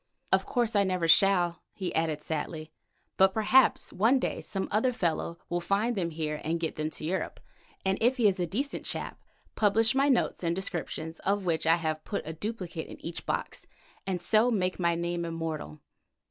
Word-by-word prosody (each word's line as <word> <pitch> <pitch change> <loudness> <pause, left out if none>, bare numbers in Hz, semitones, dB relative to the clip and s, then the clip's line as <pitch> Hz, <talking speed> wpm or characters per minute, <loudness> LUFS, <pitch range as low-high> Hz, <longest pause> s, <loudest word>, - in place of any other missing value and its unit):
"Of - - +3
course 235 -3 0
I 200 - +5
never 185 -3 0
shall," 175 -1 +4
he 185 -3 -4
added 160 -2 0
sadly, 155 0 -4 0.5
"but 190 0 +5
perhaps 225 +5 +4
one 225 +8 +4
day 255 - -2
some 195 -1 -3
other 220 +5 +2
fellow 170 -6 -1
will 175 0 -1
find 200 +7 +1
them 175 -4 -1
here 155 -2 -3
and 165 +2 -1
get 165 -1 -2
them 155 0 -2
to 155 - -6
Europe, 185 +4 -2 0.5
and 190 +1 +1
if 245 +4 +3
he 230 -4 +4
is 190 -2 +1
a 175 - 0
decent 270 - -2
chap, - - -5 0.3
publish 220 +1 +3
my 275 +2 +3
notes 250 -7 +1
and 170 0 +1
descriptions, 165 -3 -4
of 200 0 0
which 160 -2 0
I 165 - +6
have 155 -2 -2
put 205 - -4
a 160 - -4
duplicate 180 -3 -5
in - - -10
each 165 0 -6
box, - - -3 0.4
and 185 -2 -1
so 220 +6 +3
make 185 -6 0
my 170 -1 +2
name 170 0 -2
immortal. 165 - -4
180 Hz, 190 wpm, -29 LUFS, 165-210 Hz, 0.5 s, I